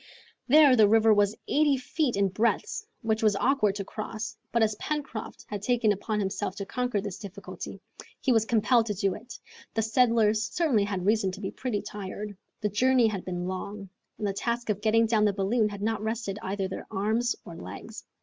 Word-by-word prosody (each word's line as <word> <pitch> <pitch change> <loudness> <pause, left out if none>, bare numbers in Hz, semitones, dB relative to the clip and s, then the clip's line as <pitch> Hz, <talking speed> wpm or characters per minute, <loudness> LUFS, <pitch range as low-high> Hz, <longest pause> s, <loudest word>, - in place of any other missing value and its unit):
There 290 -1 +7
the 215 -3 +6
river 225 0 +5
was 205 0 +3
eighty 295 -2 +3
feet 260 0 -1
in 200 -1 +2
breadth, 235 - -1 0.2
which 220 -1 0
was 215 -2 +3
awkward 210 -3 +2
to 200 - -3
cross, 220 +2 -5 0.2
but 235 0 +3
as 215 -1 +2
Pencroft 285 -7 -5
had 205 -2 -5
taken 230 -1 +2
upon 210 +2 -2
himself 190 -1 -2
to 200 - -5
conquer 245 0 -1
this 200 -2 -6
difficulty, 200 0 -8 0.4
he 265 - +1
was 225 -3 +4
compelled 230 +1 +3
to 210 - -2
do 195 -1 +1
it. 235 -1 -9 0.4
The 225 - +2
settlers 225 -2 +3
certainly 260 -12 +2
had 190 -3 -3
reason 210 -2 +3
to 195 - -8
be 195 -2 -4
pretty 235 -6 -3
tired. 205 +1 -6 0.3
The 210 - +1
journey 250 +4 +3
had 205 -4 -1
been 180 -1 -4
long, 195 +1 -5 0.3
and 215 - -3
the 200 - 0
task 235 +2 -1
of 205 0 -3
getting 225 +1 +4
down 220 -2 +3
the 205 - +2
balloon 210 +3 +1
had 200 0 -7
not 220 -1 0
rested 220 -2 -3
either 195 0 -2
their 190 - -7
arms 220 +4 0
or 170 - -9
legs. 215 +5 -9
215 Hz, 200 wpm, -28 LUFS, 200-235 Hz, 0.4 s, There